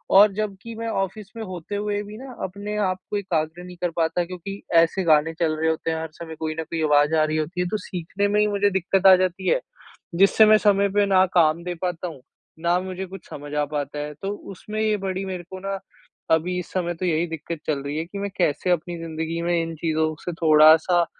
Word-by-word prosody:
और 205 +1 +8
जब 210 -1 -2
कि 230 0 -8
मैं 230 +1 -4
ऑफ़िस 200 0 -3
में 225 - -4
होते 185 0 -6
हुए 205 0 -1
भी 210 +1 -10
ना, 265 +1 -9
अपने 205 +3 -5
आपको 190 0 -1
एकाग्र 170 -3 -2
नहीं 180 0 -10
कर 175 - +1
पाता 170 +1 0
क्योंकि 185 +3 -7
ऐसे 165 +3 +4
गाने 160 0 +4
चल 160 -2 +1
रहे 160 - +2
होते 160 0 -1
हैं, 160 - -1
हर 160 - -5
समय 160 -1 -8
कोई 155 -1 -2
न - - -1
कोई 160 0 -4
आवाज़ 150 +1 +4
आ 155 - +4
रही 155 0 0
होती 175 +4 -2
है, 180 - 0
तो 215 - -1
सीखने 190 +2 -3
में 210 +1 +2
ही 210 - +4
मुझे 205 0 +2
दिक्कत 190 0 +2
आ 190 - +10
जाती 185 0 -1
है, - - +3 0.6
जिससे 195 +4 +6
मैं 215 0 +7
समय 200 -1 +3
पे 205 - +5
ना 190 -1 +4
काम 165 -1 +4
दे 180 0 -3
पाता 180 -1 -2
हूँ, 155 -7 -9 0.4
ना 170 +2 +2
मुझे 185 +1 -5
कुछ 195 +1 -11
समझ 145 0 -8
आ 150 0 +2
पाता 145 0 -3
है। 150 0 -4
तो 195 - -3 0.2
उसमें 215 +3 -6
ये 215 -1 +2
बड़ी 190 -1 -3
मेरे 185 -2 -5
को 190 - -6
ना, 195 0 -4 0.5
अभी 175 +3 +2
इस 180 - -8
समय 175 -2 -1
तो 185 - -1
यही 170 0 +1
दिक्कत 165 0 -6
चल 145 -3 0
रही 145 +2 -4
है 160 - -2
कि 200 +3 -7
मैं 200 0 -2
कैसे 175 0 +1
अपनी 175 0 -1
ज़िंदगी 165 0 -4
में 175 +1 0
इन 165 0 -4
चीज़ों 155 0 0
से 175 - -3
थोड़ा-सा 160 +2 +6
180 Hz, 240 wpm, -24 LUFS, 160-195 Hz, 0.6 s, आ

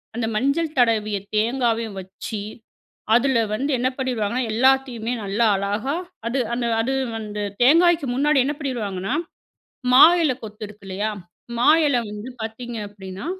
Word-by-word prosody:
அந்த 230 -1 -1
மஞ்சள் 290 +7 0
தடவிய 215 -4 +2 0.2
தேங்காவையும் 230 -2 0
வச்சி, 190 +3 -7 0.8
அதில 250 -1 +3
வந்து 275 +7 -1
என்ன 250 +1 +1
பண்ணிருவாங்கன்னா, 250 -2 -1
எல்லாத்தையுமே 250 -1 +2
நல்லா 200 +4 +1
அழகா 205 +8 -1 0.3
அது 255 +4 -1
அந்த 240 0 -1 0.2
அது 265 +4 -1 0.2
வந்து 210 -1 -5 0.2
தேங்காய்க்கு 330 +3 +5
முன்னாடி 290 +2 +3
என்ன 290 - -1
பண்ணிருவாங்கன்னா, 220 -6 -3 0.8
மா 255 - +9 0.2
இல 300 -5 +3
கொத்து 215 0 -8
இருக்கு, 210 -1 -15
இல்லயா? 205 +3 -2 0.5
மா 240 - +3 0.2
இல 280 - +2
வந்து 210 +3 -7
பார்த்தீங்க 235 +2 -6
அப்பிடின்னா, 190 +2 -9
235 Hz, 135 wpm, -22 LUFS, 210-265 Hz, 0.8 s, மா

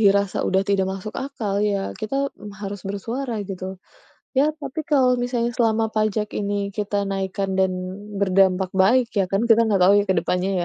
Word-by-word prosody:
dirasa 200 -1 +3
udah 190 0 +2
tidak 195 -1 +2
masuk 195 +2 -5
akal, 225 -7 -2
ya 200 -2 0
kita 275 +5 -2 0.3
harus 200 -1 -5
bersuara, 230 +5 -3
gitu. 190 -1 -6 0.6
Ya 290 +3 +4
tapi 290 +1 -5
kalau 255 -4 +3
misalnya 245 -1 0
selama 225 -2 +1
pajak 215 -1 0
ini 200 -1 -1
kita 205 0 -1
naikkan 195 0 -2
dan 190 -1 +3 0.5
berdampak 190 -1 +3
baik 225 +6 +4
ya 195 - +3
kan, 200 +4 +1
kita 230 0 +6
nggak 200 -4 +2
tahu 190 +3 +6
ya - - -4
ke - - +5
depannya 180 +2 0
205 Hz, 170 wpm, -23 LUFS, 195-235 Hz, 0.6 s, kita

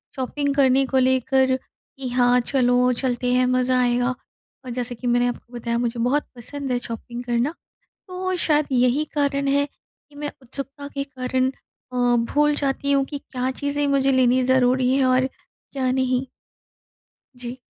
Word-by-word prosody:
Shopping 280 +2 -1
करने 270 -1 +4
को 265 0 0
लेकर, 260 0 +3 0.4
कि 270 -1 -5
हाँ 245 0 +3
चलो 250 0 +2
चलते 245 0 0
हैं, 255 0 +3
मज़ा 255 0 +2
आएगा। 245 0 +2 0.6
और - - -6
जैसे 245 0 -3
कि 245 +2 -5
मैंने 245 0 +3
आपको 245 0 -6
बताया 235 -1 -2
मुझे 235 0 -2
बहुत 260 +5 +1
पसंद 270 +3 -5
है 245 - +1
शॉपिंग 240 +1 -6
करना, 245 +5 0 0.6
तो 370 0 -2
शायद 300 -3 +2
यही 250 +4 +3
कारण 280 -1 +1
है 285 +1 +2
कि 290 0 -31
मैं 295 0 -4
उत्सुकता 275 +3 -7
के 275 0 -2
कारण 260 -1 -1 0.4
अ, - - -5 0.4
भूल 295 0 +3
जाती 280 0 -1
हूँ 275 -1 +3
कि 285 +1 -6
क्या 255 -2 -3
चीज़ें 285 +2 -1
मुझे 275 -1 +3
लेनी 255 0 +3
ज़रूरी 255 0 +3
हैं 275 - +3
और 255 0 +3
क्या 265 0 -6
नहीं? 260 0 0 1.1
जी। 245 0 -7
260 Hz, 165 wpm, -23 LUFS, 245-280 Hz, 1.1 s, करने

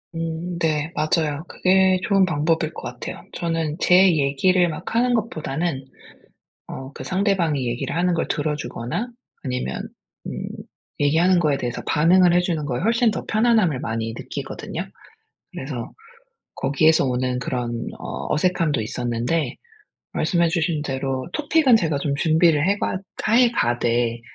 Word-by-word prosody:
음 165 +2 -4
네 155 -1 0
맞아요. 155 -1 0
그게 190 0 +3
좋은 195 -2 +3
방법일 160 -1 0
것 - - -8
같아요. - - -7
저는 165 -2 -2
제 - - +3 0.2
얘기를 175 +6 +3
막 160 +5 -6
하는 245 +1 +3
것보다는 160 - -2 0.8
어 130 +1 -7
그 - - -8
상대방이 185 -8 0
얘기를 120 +6 -3
하는 180 +1 +2
걸 165 - -1
들어 150 0 -1
주거나 125 - -4 0.3
아니면 125 -2 -3 0.4
음 - - -5 0.5
얘기하는 165 +6 +4
거에 150 -5 +2
대해서 125 -2 -4
반응을 175 +3 +4
해 175 - +5
주는 170 -4 -1
거에 125 -4 -2
훨씬 230 +2 +3
더 - - -4
편안함을 215 - +2
많이 115 0 -3
느끼거든요. - - -6 0.7
그래서 130 -3 -6 0.6
거기에서 155 +2 +3
오는 125 0 -1
그런 120 -2 -3
어 - - -5
어색함도 160 -4 +1
있었는데 120 +7 -2 0.6
말씀해 170 -2 +1
주신 165 -2 0
대로 135 -2 -3
토픽은 300 -4 +4
제가 160 -8 0
좀 140 -1 -1
준비를 160 +1 +3
해 200 +1 +2
봐 - - -1 0.4
해 245 0 +6
가되 120 - 0
160 Hz, 300 characters per minute, -22 LUFS, 135-180 Hz, 0.8 s, 해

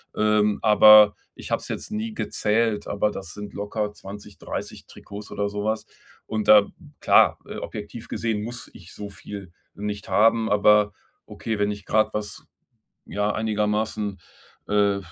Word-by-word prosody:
Ähm, 105 -1 +2
aber 105 -1 +8 0.2
ich - - -10
habe - - +1
es - - -9
jetzt - - -5
nie 220 +1 -3
gezählt, 110 - 0
aber 105 +1 0
das 95 -3 -8
sind 105 -1 -8
locker 105 +1 -3
20, 100 0 -11
30 - - -7
Trikots 100 0 -11
oder 100 0 -2
sowas. 105 +2 -3 0.4
Und 110 -1 -3
da, 105 -1 +7 0.3
klar, - - +4
äh, - - -7
objektiv 110 +2 -8
gesehen 110 -3 -2
muss 120 +2 -8
ich 90 -1 -14
so 105 -1 -7
viel 100 -1 -10 0.2
nicht 105 0 -5
haben, 110 +1 +3
aber 105 0 +4 0.4
okay, 110 -1 -4
wenn 105 0 +1
ich 100 -1 -8
gerad 110 0 +1
was, 105 -1 -5 0.6
ja, 105 0 -1
einigermaßen, 105 -1 -1 0.5
äh, 100 -1 +2
105 Hz, 150 wpm, -24 LUFS, 100-110 Hz, 0.6 s, aber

